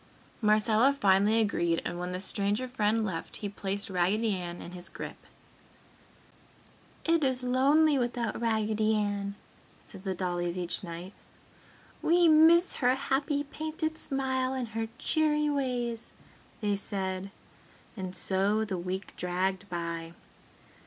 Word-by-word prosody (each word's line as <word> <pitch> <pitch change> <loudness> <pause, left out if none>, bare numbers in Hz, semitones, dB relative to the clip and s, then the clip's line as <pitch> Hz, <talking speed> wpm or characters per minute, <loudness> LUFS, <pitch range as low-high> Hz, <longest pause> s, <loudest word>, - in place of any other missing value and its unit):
Marcella 215 +4 +4
finally 200 +3 +4
agreed 170 -6 +1
and 175 - -3
when 180 0 -3
the 180 - -3
stranger 205 +5 +1
friend 225 -3 +1
left, 165 -5 -5
he 205 - -4
placed 200 0 -3
Raggedy 200 +3 +1
Ann 175 -1 -5
in 175 - -8
his 180 0 -6
grip. - - -7 1.9
"It 330 -1 +3
is 260 -2 +1
lonely 280 +4 +4
without 240 -2 -2
Raggedy 220 -1 +1
Ann!" 205 -1 -1 0.5
said 195 -3 -12
the 190 -2 -2
dollies 175 -1 -2
each 175 +1 -2
night. 175 +2 -7 0.9
"We 345 +1 +4
miss 325 +3 +6
her 250 0 +3
happy 280 +2 0
painted 315 +2 -4
smile 265 -3 -1
and 250 -3 -3
her 225 +1 -3
cheery 300 -1 +2
ways!" 245 -4 -2 0.5
they 205 -1 +1
said. 190 -1 -3 0.7
And 185 -3 -5
so 200 +4 +2
the 190 -4 -3
week 185 +2 -4
dragged 185 +2 -1
by.... 170 -1 -4
215 Hz, 130 wpm, -29 LUFS, 190-260 Hz, 1.9 s, miss